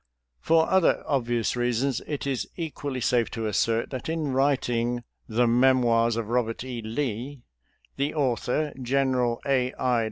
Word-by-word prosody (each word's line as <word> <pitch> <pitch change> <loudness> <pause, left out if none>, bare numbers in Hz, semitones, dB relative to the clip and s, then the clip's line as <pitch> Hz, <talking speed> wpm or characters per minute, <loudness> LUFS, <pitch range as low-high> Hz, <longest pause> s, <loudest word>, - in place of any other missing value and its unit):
For 160 - +3
other 190 -2 +3
obvious 120 -5 0
reasons, 125 +1 0
it 145 -2 -3
is 125 -7 -2
equally 145 -5 -4
safe 120 -1 +2
to 115 -1 -4
assert 115 +2 0
that 130 +3 -5
in 160 -4 -1
writ 135 +1 +2
ing 120 0 -1
" - - -39
The 125 - +5
Memoirs 120 -2 +3
of 115 -1 -2
Eobert 115 0 -1
E. 125 -2 -5
Lee," 120 +3 -4 0.5
the 140 +3 -1
author. 140 +2 0
General 125 -2 +1
A. 130 -2 +1
I. 125 -2 +1
125 Hz, 155 wpm, -26 LUFS, 115-140 Hz, 0.5 s, The